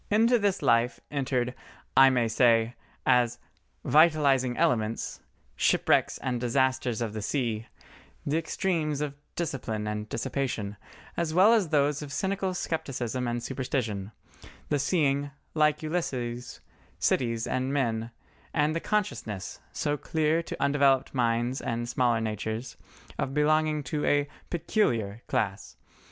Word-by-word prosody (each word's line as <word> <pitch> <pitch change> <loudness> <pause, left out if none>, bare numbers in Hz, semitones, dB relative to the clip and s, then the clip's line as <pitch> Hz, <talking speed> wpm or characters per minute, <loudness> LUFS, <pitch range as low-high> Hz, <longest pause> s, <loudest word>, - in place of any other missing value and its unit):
Into 230 +3 +4
this 200 -2 0
life 115 0 +3
entered, 130 -3 -1 0.4
I 135 0 +8
may 125 -3 +2
say, 115 0 +3 0.3
as 120 -2 +3 0.5
"vitalising 145 -6 +4
elements," 110 -1 0 0.4
"shipwrecks - - +2
and 125 -2 -2
disasters 130 -1 +1
of 110 -3 -2
the 110 - -4
sea," 115 -1 -2 0.6
the 150 +3 +1
extremes 160 -3 -1
of 145 -2 -2 0.2
discipline 125 -10 -3
and 105 0 -4
dissipation, 115 -5 -2 0.4
as 165 -2 -1
well 200 +5 +7
as 205 -8 +2
those 145 -1 +2
of 145 -2 -7
cynical 190 +2 -1
scepticism 130 -7 -2
and 120 0 -2
superstition, 115 -7 -3 0.6
the 145 - +1
seeing, 140 -1 +1 0.2
like 150 -1 +2
Ulysses, 125 -7 -3 0.4
cities 115 -2 +1
and 130 +2 -1
men, 115 -5 0 0.5
and 150 0 +2
the - - +1
consciousness, 165 - -2
so 145 -1 -1
clear 160 +3 +1
to - - -7
undeveloped 140 -2 +3
minds 120 0 0
and 120 0 -2
smaller 120 -2 +2
natures, 110 +2 -3 0.4
of 135 - -2
belonging 155 0 +2
to 150 +3 -3
a 145 0 +2 0.2
"peculiar" 120 - 0
class. 95 - -2
130 Hz, 125 wpm, -28 LUFS, 115-150 Hz, 0.6 s, I